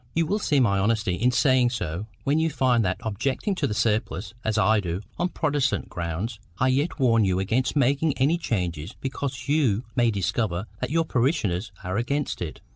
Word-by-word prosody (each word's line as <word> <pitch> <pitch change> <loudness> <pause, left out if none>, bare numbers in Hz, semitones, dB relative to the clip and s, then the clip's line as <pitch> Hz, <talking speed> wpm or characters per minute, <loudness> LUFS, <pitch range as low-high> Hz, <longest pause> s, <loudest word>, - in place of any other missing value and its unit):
You 165 0 +3
will 205 +7 0
see 145 -8 +2
my 100 -6 +3
honesty 105 -2 +1
in 120 +7 +2
saying 125 0 +3
so 90 -3 -4 0.2
when 145 +3 +2
you 160 0 +2
find 125 -5 +2
that, 95 -1 0
objecting 130 - -1
to 160 -7 0
the 105 - -3
surplice, 105 -3 -1
as 110 -1 0
I 110 +1 +4
do, 90 -1 -3 0.2
on 175 +1 +1
Protestant 145 -6 0
grounds, 90 +6 -4 0.2
I 130 - +2
yet 140 +6 0
warn 115 -4 +4
you 95 -2 +1
against 115 +9 0
making 140 +1 +2
any 145 +6 +2
change 90 - -3
because 135 -1 -4
you 135 -7 +2
may 120 -1 +3
discover 100 -2 -1
that 125 - -2
your 165 +2 +1
parishioners 120 - 0
are 90 +2 -2
against 140 +5 -1
it. 80 -3 -5
120 Hz, 190 wpm, -25 LUFS, 100-140 Hz, 0.2 s, I